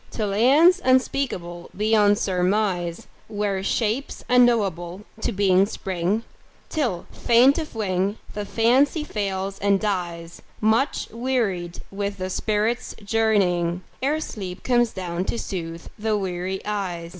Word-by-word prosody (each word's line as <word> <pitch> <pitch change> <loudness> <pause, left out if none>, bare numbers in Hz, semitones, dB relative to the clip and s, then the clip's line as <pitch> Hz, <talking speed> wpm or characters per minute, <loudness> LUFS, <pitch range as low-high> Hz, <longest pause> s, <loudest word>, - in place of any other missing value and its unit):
To 215 - -1
lands 280 - +5
unspeakable 255 -10 0
beyond 210 -1 +4
surmise, 185 -3 0 0.2
Where 205 -2 -2
shapes 225 +6 -1
unknowable 205 -8 +2 0.2
to - - 0
being 195 -1 +3
spring, 190 +2 -2 0.5
Till, 245 - -1
faint 250 +6 +4
of 310 -6 -6
wing, 195 -1 -1 0.2
the 210 - -3
Fancy 255 +9 +2
fails 195 -6 -3
and 200 0 +2
dies 175 -5 -3 0.2
Much 220 +6 +1
wearied 220 -8 -2
with 200 0 -3
the 185 0 -4
spirit's 215 +4 -1
journeying, 190 -5 +1 0.2
Ere 295 +4 +1
sleep 190 -11 -6
comes 240 -2 +2
down 180 -2 -3
to 235 - -2
soothe 165 -5 -5
the 215 0 +1
weary 190 -1 -3
eyes. 185 -5 -3
205 Hz, 120 wpm, -23 LUFS, 185-230 Hz, 0.5 s, lands